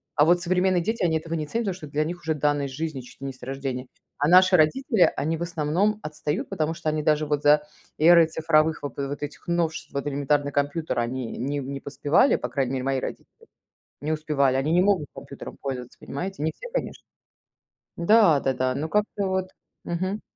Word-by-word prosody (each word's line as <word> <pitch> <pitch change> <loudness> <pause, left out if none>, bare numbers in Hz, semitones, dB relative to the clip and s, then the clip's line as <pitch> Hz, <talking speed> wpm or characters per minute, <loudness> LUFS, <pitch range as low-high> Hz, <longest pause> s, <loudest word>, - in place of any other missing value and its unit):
а 150 0 +5
вот 175 +1 +4
современные 185 0 +2
дети, 225 -1 -1
они 160 -2 +2
этого 165 +1 -6
не 155 -2 -2
ценят, 230 +4 -2
потому 195 - -1
что 160 - -9
это 145 - -18
для 150 +1 +2
них 175 +2 -5
уже 160 0 -1
данная 145 -1 +1
жизни 145 0 -4
чуть 125 - -15
ли 135 - -4
не 135 - -5
с 130 - -21
рождения. 135 -1 -4 0.3
А 145 - +2
наши 185 +2 +6
родители 195 - +3
они, 160 +3 -1
в - - -10
основном, 170 +6 0
отстают, 150 +2 -3
потому 160 -4 -1
что 160 -2 -2
они 155 0 -1
даже 155 0 +2
вот 145 -1 -1
за 150 0 +5 0.3
эрой 165 +1 +7
цифровых 160 -1 +1
в 145 - -2
вот 140 +1 -4
этих 145 - -8
новшеств, 170 -2 -1
вот 140 0 -3
элементарный 145 0 0
компьютер 145 0 -1
они 120 0 -3
не 140 +4 -2
не 140 +1 -5
поспевали. 145 - +2
По 125 - -4
крайней 130 +1 -1
мере, 130 -1 -2
мои 135 -1 +1
родители - - -8 0.5
не 155 +2 -2
успевали. 145 -4 +1
Они 140 +4 0
не 175 +1 +4
могут 185 -7 +2
компьютером 140 0 -9
пользоваться, 125 -3 -5
понимаете? 185 +4 -5
Не 160 - +1
все, - - -9
конечно. - - -3 0.9
Да-да-да, 145 - +3
но 155 +2 -2
как-то 210 0 0
вот. 190 0 -1 0.3
Мгм. 185 +4 -2
155 Hz, 200 wpm, -25 LUFS, 140-175 Hz, 0.9 s, эрой